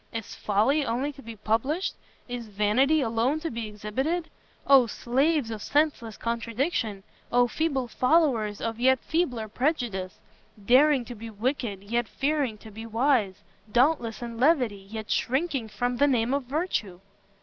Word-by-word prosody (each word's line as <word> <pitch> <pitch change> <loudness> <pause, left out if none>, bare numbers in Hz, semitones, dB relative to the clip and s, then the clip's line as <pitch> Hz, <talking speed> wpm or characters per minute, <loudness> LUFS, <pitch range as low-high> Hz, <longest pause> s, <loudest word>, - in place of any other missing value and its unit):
Is 225 -2 -6
folly 220 +9 +1
only 260 +4 -1
to 275 - -14
be 230 -2 -9
published? 230 - -1 0.3
Is 245 -2 -5
vanity 215 +9 +2
alone 235 +5 +1
to 330 - -3
be 230 -2 -4
exhibited? 260 +12 -3 0.3
Oh 270 -3 +6
slaves 265 +3 0
of 215 -2 -5
senseless 285 -7 0
contradiction! 230 - -2 0.3
Oh 245 0 +4
feeble 275 -2 -1
followers 250 -7 +2
of 230 0 -3
yet 260 +1 +4
feebler 260 -10 -1
prejudice! 225 - -2 0.5
daring 265 +1 +5
to 245 - -7
be 230 0 -8
wicked, 220 -2 -2
yet 235 +3 -1
fearing 275 -5 -1
to 220 +1 -13
be 225 +2 -8
wise; 225 -4 +1 0.3
dauntless 240 -2 +2
in 235 -1 -6
levity, 245 -9 +2
yet 220 0 -6
shrinking 270 -2 0
from 245 +4 -2
the 285 - +4
name 245 -2 +1
of 280 -2 -1
virtue!" 255 - -2
240 Hz, 150 wpm, -27 LUFS, 220-280 Hz, 0.5 s, Oh